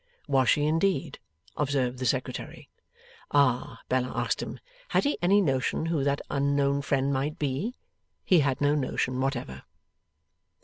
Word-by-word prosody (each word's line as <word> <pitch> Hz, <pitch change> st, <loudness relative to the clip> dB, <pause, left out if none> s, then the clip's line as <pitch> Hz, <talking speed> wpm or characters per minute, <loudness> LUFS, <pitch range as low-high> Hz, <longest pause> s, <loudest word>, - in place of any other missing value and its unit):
Was 135 Hz, -3 st, +3 dB
she, 145 Hz, -, +3 dB
indeed? 165 Hz, +1 st, 0 dB, 0.4 s
observed 130 Hz, -3 st, 0 dB
the 130 Hz, -, -1 dB
Secretary. 130 Hz, -1 st, -3 dB, 0.6 s
Ah! 135 Hz, -4 st, +1 dB
Bella 125 Hz, 0 st, 0 dB
asked -, -, -1 dB
him, -, -, -6 dB, 0.3 s
had -, -, +2 dB
he 285 Hz, -, +1 dB
any 195 Hz, +4 st, +4 dB
notion 135 Hz, -2 st, 0 dB
who 165 Hz, -4 st, 0 dB
that 140 Hz, 0 st, 0 dB
unknown 140 Hz, 0 st, +1 dB
friend 140 Hz, 0 st, 0 dB
might 140 Hz, +3 st, -1 dB
be? 150 Hz, -, -2 dB, 0.5 s
He 180 Hz, -, +5 dB
had 140 Hz, -2 st, 0 dB
no 145 Hz, 0 st, +3 dB
notion 130 Hz, -2 st, -1 dB
whatever. 120 Hz, -, -3 dB
140 Hz, 140 wpm, -27 LUFS, 130-150 Hz, 0.6 s, He